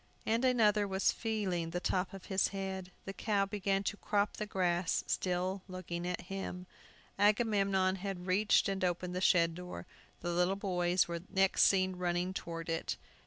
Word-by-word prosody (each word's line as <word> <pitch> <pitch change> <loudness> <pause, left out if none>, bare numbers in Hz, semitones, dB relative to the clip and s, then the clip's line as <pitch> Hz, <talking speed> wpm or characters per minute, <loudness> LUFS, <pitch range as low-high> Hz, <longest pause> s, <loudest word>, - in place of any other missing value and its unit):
Another 225 -3 +3
was 190 0 +2
feeling 195 -7 -2
the 175 +2 -2
top 180 +1 0
of 195 -1 -10
his 190 -1 +2
head. 190 -1 -5
The 195 - -5
cow 200 -1 +1
began 195 -1 -1
to 205 - -2
crop 205 0 0
the 210 - -3
grass, 175 -3 0
still 185 +1 -1
looking 175 -2 -5
at 180 - -2
him. 185 -1 -6 0.5
Agamemnon 200 -3 +3
had 190 -2 -5
reached 200 +4 +3
and 195 -1 -2
opened 180 0 -1
the 185 - -2
shed 170 -3 +4
door. 180 +1 -7 0.4
The 175 - -2
little 180 +2 +2
boys 180 -2 +1
were 170 0 -3
next 195 -1 +4
seen 185 -1 +2
running 180 +1 -1
toward 165 -3 -5
it. 165 0 -2
190 Hz, 165 wpm, -33 LUFS, 180-200 Hz, 0.5 s, shed